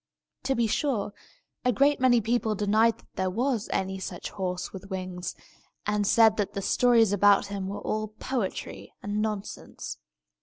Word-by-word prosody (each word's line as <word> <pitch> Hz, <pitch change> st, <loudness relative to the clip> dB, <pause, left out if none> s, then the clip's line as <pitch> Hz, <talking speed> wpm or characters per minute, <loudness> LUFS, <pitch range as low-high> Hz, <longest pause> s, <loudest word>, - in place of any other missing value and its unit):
To 270 Hz, 0 st, +1 dB
be 235 Hz, -, +2 dB
sure, 220 Hz, -3 st, 0 dB, 0.5 s
a 250 Hz, -, +3 dB
great 280 Hz, +6 st, +3 dB
many 250 Hz, -2 st, +5 dB
people 225 Hz, 0 st, 0 dB
denied 215 Hz, +3 st, +3 dB
that -, -, -22 dB
there 190 Hz, 0 st, -1 dB
was 235 Hz, +2 st, -1 dB
any 190 Hz, 0 st, -1 dB
such 180 Hz, -1 st, -6 dB
horse 180 Hz, -2 st, -3 dB
with 195 Hz, 0 st, -9 dB
wings, 185 Hz, -2 st, -4 dB, 0.5 s
and 210 Hz, -1 st, +1 dB
said 220 Hz, 0 st, +5 dB
that 205 Hz, -2 st, -1 dB
the 200 Hz, -, -3 dB
stories 230 Hz, -3 st, +4 dB
about 205 Hz, 0 st, +5 dB
him 195 Hz, -1 st, -3 dB
were 200 Hz, -, -5 dB
all 215 Hz, 0 st, -2 dB
poetry 215 Hz, 0 st, -4 dB
and 205 Hz, +1 st, -1 dB
nonsense. 205 Hz, -, -5 dB
210 Hz, 160 wpm, -27 LUFS, 195-230 Hz, 0.5 s, many